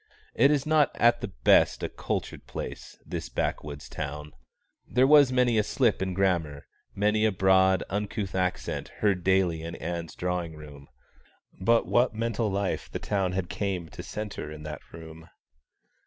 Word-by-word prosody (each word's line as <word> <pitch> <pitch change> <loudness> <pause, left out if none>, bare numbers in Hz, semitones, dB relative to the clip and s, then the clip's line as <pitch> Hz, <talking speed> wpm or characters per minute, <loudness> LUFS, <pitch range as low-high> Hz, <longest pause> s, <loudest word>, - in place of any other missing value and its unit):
It 140 +5 +5
is 145 -2 +1
not 155 -2 +4
at 120 0 +3
the - - -3
best - - +3
a - - 0
cultured - - -5
place, - - -7
this - - -5
backwoods 70 +3 -3
town. 75 +1 -6 0.6
There 125 +1 +3
was 145 -2 +6
many 125 -3 +3
a - - +3
slip 115 -3 +1
in 95 -1 -2
grammar, 85 -7 0 0.3
many 105 +2 +2
a 110 - +4
broad 95 -1 +4
uncouth 100 0 -3
accent, 90 -1 -2 0.2
heard 95 -4 +2
daily 95 -3 +2
in 85 +1 -6
Ann's 85 -1 -5
drawing 90 -2 -3
room; 75 -2 -12 0.7
but 115 +5 +2
what 120 -2 +2
mental 115 0 -1
life 100 -1 -2
the - - -3
town 95 -3 -1
had 95 -1 -2
came 95 -5 -3
to - - -8
centre 105 -7 -6
in 75 0 -9
that 75 0 -6
room. 80 0 -11
95 Hz, 160 wpm, -27 LUFS, 80-110 Hz, 0.7 s, was